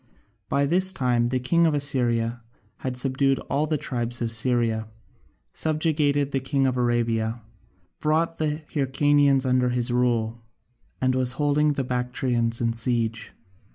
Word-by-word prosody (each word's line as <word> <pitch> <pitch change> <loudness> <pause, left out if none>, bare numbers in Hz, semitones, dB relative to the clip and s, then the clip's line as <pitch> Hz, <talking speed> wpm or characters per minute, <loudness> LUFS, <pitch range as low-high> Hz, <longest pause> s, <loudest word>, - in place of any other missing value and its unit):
By 140 0 +1
this 185 +5 +2
time 125 -8 +1
the 130 +1 -1
king 170 +7 +2
of 155 - +1
Assyria 120 -5 0 0.4
had 130 -1 -5
subdued 135 +1 +1
all 145 +3 +1
the 155 0 0
tribes 120 -3 -3
of 115 -1 -2
Syria, 115 -1 +2 0.7
subjugated 150 -3 0
the 135 - 0
king 135 +1 0
of 130 -1 +1
Arabia, 115 -2 0 0.6
brought 160 +2 0
the 155 0 -2
Hyrcanians 140 -1 +2
under 125 -1 +2
his 120 0 -1
rule, 120 -2 0 0.6
and 130 0 +1
was 130 -1 +1
holding 150 +1 +1
the 140 - -2
Bactrians 125 -2 -1
in 115 -1 0
siege. 115 -1 -1
130 Hz, 140 wpm, -24 LUFS, 120-145 Hz, 0.7 s, this